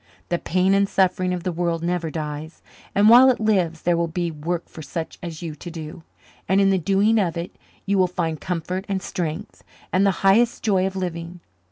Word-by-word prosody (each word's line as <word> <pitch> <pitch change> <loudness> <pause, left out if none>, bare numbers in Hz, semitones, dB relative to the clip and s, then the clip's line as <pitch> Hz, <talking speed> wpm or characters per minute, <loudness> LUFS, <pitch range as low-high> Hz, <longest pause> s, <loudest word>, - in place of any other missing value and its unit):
The 175 - 0
pain 185 +2 +1
and 200 0 +3
suffering 185 -1 +1
of 180 -2 -3
the 185 - -1
world 170 -1 -2
never 175 -1 -1
dies, 155 0 -6 0.3
and 205 +1 +5
while 245 +4 +8
it 255 - +1
lives 185 -7 +1
there 175 0 +2
will 170 0 0
be 170 +1 -2
work 165 +3 -4
for 160 - -11
such 160 +2 -6
as 170 -2 -7
you 165 -2 -4
to 155 +4 -9
do, 160 -1 -8 0.5
and 190 +1 +4
in 195 -1 +4
the 190 - +2
doing 200 +6 +2
of 175 -4 0
it 170 +1 -5 0.3
you 200 -1 +1
will 185 - +4
find 165 -4 -3
comfort 180 +2 -3
and 195 -1 0
strength 175 +2 -5 0.3
and 185 - +3
the 200 - +4 0.2
highest 230 +5 +4
joy 190 -3 +2
of 190 - -6
living. 175 -1 -5
180 Hz, 210 wpm, -23 LUFS, 165-195 Hz, 0.5 s, while